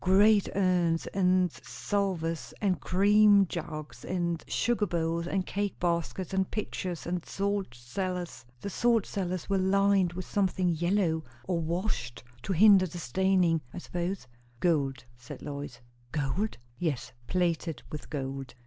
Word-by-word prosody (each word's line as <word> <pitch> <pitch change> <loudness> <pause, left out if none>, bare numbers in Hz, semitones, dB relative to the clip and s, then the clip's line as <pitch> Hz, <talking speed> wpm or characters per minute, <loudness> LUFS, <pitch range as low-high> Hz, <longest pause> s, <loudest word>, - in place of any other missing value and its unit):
Great 200 +2 +5
urns, 180 -4 +2
and 185 -2 +3
salvers, 165 -1 -2
and 190 -5 +1
cream 205 +1 +5
jugs, 155 -3 -6
and 170 -2 -1
sugar 230 -3 +1
bowls, 170 0 -1
and 190 0 0
cake 205 0 -2
baskets, 175 +2 -1
and 190 -1 +1
pitchers, 185 -5 -4
and 175 0 -2
salt 200 -8 -2
cellars. 180 +8 -4 0.2
The 200 - -4
salt 230 +1 +2
cellars 185 -3 -3
were 195 -1 +1
lined 195 -1 +3
with 185 0 -5
something 190 -2 +1
yellow, 170 -1 +1 0.2
or 170 +5 -1
washed, 165 - -2 0.2
to 195 - -4
hinder 195 0 +7
the 175 - -8
staining, 175 +1 +2
I - - -5
suppose." 175 -2 -3 0.3
"Gold," 140 -7 +1
said 125 0 -10
Lois. 140 -4 -6 0.3
"Gold?" 160 +9 -1 0.2
"Yes. 140 -9 -2
Plated 170 -3 0
with 150 - -7
gold." 135 -2 -5
180 Hz, 135 wpm, -29 LUFS, 160-195 Hz, 0.3 s, hinder